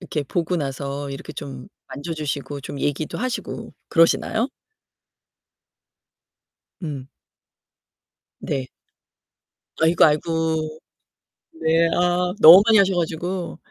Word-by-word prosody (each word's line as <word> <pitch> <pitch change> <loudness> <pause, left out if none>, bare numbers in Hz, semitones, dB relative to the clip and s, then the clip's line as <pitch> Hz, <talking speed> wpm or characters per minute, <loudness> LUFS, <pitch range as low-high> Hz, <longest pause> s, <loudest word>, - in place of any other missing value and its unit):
이렇게 165 -5 -3
보고 170 +5 -2
나서 140 -1 -4
이렇게 135 +3 -8
좀 135 -3 -8 0.2
만져 160 +4 -6
주시고 145 -1 -4
좀 140 0 -7
얘기도 145 +2 -2
하시고 255 +1 -4 0.2
그러시나요? 220 +8 +2 2.3
음. 140 -5 -6 1.3
네. 135 -2 -3 1.2
아이구, 165 +1 +5
아이구. 160 0 0 0.8
네. 165 +1 +3
아, 180 0 +1
너무 175 +1 +10
많이 225 -1 +5
하셔 195 -1 +3
가지고. 175 +2 -3
160 Hz, 205 characters per minute, -22 LUFS, 145-175 Hz, 2.3 s, 너무